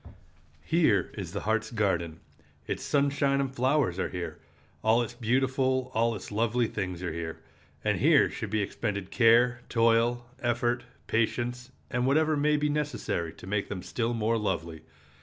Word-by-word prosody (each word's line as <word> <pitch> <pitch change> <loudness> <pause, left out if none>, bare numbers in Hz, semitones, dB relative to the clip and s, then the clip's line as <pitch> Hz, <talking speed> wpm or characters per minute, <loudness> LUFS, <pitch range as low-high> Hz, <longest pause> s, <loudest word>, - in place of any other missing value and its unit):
Here 160 -11 +2
is 95 -5 -5
the 100 - -4
heart's 110 +1 0
garden. 90 -8 -1 0.4
Its - - -3
sunshine 140 -1 +1
and 135 -1 -1
flowers 130 - +1
are - - -1
here. 90 -1 -5 0.4
All 115 +2 +4
its 120 - -6
beautiful, 130 +2 0
all 115 +1 +2
its 100 - -8
lovely 115 +3 +1
things 90 -5 -4
are 90 - -2
here. 80 -1 -5 0.5
And - - +1
here - - +5
should 110 - -5
be 105 0 0
expended 100 -2 -3
care, 120 +1 +4
toil, 115 +1 +2 0.2
effort, 120 0 0 0.2
patience, 120 +2 -1 0.2
and 125 -1 0
whatever 155 +3 +3
may 150 +1 +2
be 150 0 +1
necessary 145 - -2
to - - -13
make 100 +1 -2
them 95 -3 -5
still 120 0 -2
more 115 +1 +1
lovely. 85 -6 -3
115 Hz, 160 wpm, -28 LUFS, 100-130 Hz, 0.5 s, here